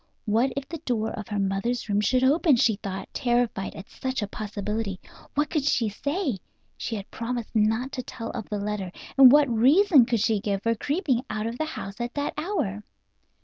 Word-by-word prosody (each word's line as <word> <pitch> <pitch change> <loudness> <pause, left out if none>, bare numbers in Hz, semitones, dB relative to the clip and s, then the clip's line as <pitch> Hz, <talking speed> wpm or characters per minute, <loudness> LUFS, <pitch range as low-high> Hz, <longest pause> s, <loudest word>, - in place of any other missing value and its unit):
What 230 +5 +2
if 275 -1 -3
the 330 - -6
door 235 -7 -1
of 215 -2 -6
her 210 -2 -3
mother's 195 +6 -1
room 205 0 +1
should 255 +5 +2
open, 295 +2 +4
she 225 -3 +3
thought, 195 -1 -5
terrified 240 -5 0
at 195 - -9
such 260 -3 -3
a - - -2
possibility. 210 -1 -4 0.4
What 295 +1 +1
could 305 -4 +1
she 240 -5 +2
say? 280 - -2 0.4
She 230 - -4
had 200 -1 -7
promised 235 0 -4
not 220 +5 +2
to 255 - -3
tell 230 -2 -7
of 225 - -6
the 210 - -2
letter, 200 -2 -3 0.2
and 265 -2 +9
what 295 0 +6
reason 265 - +5
could 235 -2 +1
she 220 -1 +2
give 200 -1 -2
for 230 - +2
creeping 270 - 0
out 215 0 -2
of 230 +2 -4
the 315 - +1
house 200 -9 -6
at 240 0 -4
that 285 0 -1
hour? 300 - -2
235 Hz, 200 wpm, -26 LUFS, 210-270 Hz, 0.4 s, and